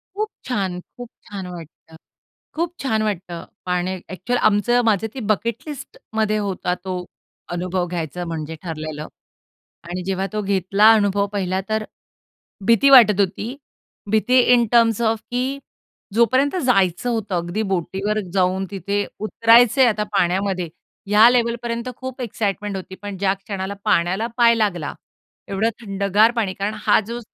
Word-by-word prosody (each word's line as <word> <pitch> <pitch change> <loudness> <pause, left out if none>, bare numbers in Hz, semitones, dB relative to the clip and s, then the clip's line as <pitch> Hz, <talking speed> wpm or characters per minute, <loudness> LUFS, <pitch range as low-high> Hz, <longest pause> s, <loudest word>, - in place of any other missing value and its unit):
खूप 430 +1 -2 0.2
छान! 195 -8 -2 0.2
खूप 245 -1 -8 0.2
छान 195 -3 -6
वाटतं. 165 -2 -11 0.6
खूप 340 +2 -1
छान 220 -5 0
वाटतं 180 -5 -4 0.2
पाण्यात 180 +1 -1
अ‍ॅक्चुअली 215 +7 -2
आमचं 240 +4 +2
माझं 220 -1 +2
ते 270 - -6
बकेट 230 +2 -2
लिस्टमध्ये 220 -6 -3
होता 195 -3 -2
तो 185 -1 -4 0.5
अनुभव 180 +1 -1
घ्यायचा 175 0 -4
म्हणजे 160 -1 -5
ठरलेलं 155 -2 -5 0.8
आणि 180 +1 -4
जेव्हा 190 +1 -2
तो 215 - -1
घेतला 195 +2 +4
अनुभव, 205 -2 +2
पाहिला 190 -2 -2
तर 215 0 0 0.8
भीती 230 +4 +5
वाटत 225 -7 +7
होती. 205 +6 -1 0.6
भीती 245 +4 +4
इन 240 -1 +4
टर्म्स 230 -2 +4
ऑफ 225 -1 +1
की 260 +3 -1 0.5
जोपर्यंत 255 - +3
जायचं 195 -1 +2
होतं 215 -5 -2
अगदी 175 +5 -2
बोटीवर 195 +4 -1
जाऊन 190 0 +1
तिथे 200 +2 -2
उतरायचंय 230 +4 +5
आता 215 -3 +1
पाण्यामध्ये, 185 -1 0 0.4
ह्या 210 +3 +7
लेवलपर्यंत 235 0 -1
खूप 260 0 -7
एक्साईटमेंट 205 -3 -2
होती. 190 0 -7
पण 205 0 -7
ज्या 190 0 +1
क्षणाला 195 0 -5
पाण्याला 190 +2 +1
पाय 235 -1 +6
लागला 180 -9 -1 0.6
एवढं 200 +3 +1
थंडगार 200 +1 +2
पाणी 200 -5 0
कारण 200 +3 -3
हा - - +5
जो 235 +1 -4
205 Hz, 140 wpm, -21 LUFS, 185-230 Hz, 0.8 s, वाटत